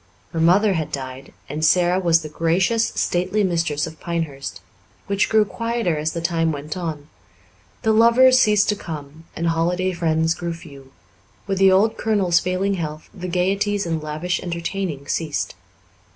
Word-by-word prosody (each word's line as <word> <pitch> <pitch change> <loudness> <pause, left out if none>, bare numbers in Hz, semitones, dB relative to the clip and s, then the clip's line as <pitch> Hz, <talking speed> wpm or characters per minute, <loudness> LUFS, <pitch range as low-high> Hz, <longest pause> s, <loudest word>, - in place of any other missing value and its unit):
Her 165 - -2
mother 195 +5 +4
had 160 -4 -2
died, 130 0 -6 0.2
and 155 +2 -4
Sara 175 +2 +4
was 165 -3 +3
the - - -5
gracious, 180 +9 +1
stately 185 +4 0
mistress 165 -5 0
of 160 - -10
Pinehurst, 160 -6 -4 0.5
which 200 0 0
grew 220 -1 +4
quieter 230 -4 -1
as 155 +1 -2
the 170 - -3
time 165 -1 +1
went 150 +2 -5
on; 160 -5 -5 0.8
the 220 - +3
lovers 245 +3 +6
ceased 210 -4 +4
to 210 - +2
come, 155 -3 -8
and 170 0 0
holiday 180 +3 0
friends 160 -1 +1
grew 170 0 -4
few; 140 -4 -13 0.5
with 195 -1 -2
the 195 -1 +6
old 205 +4 +3
colonel's 195 -6 +2
failing 185 +3 -1
health 155 -4 -5
the 180 -1 -6
gaieties 195 +3 0
and 165 -2 -2
lavish 155 +4 -2
entertaining 170 -3 -4
ceased. 155 -1 -2
170 Hz, 160 wpm, -21 LUFS, 160-195 Hz, 0.8 s, lovers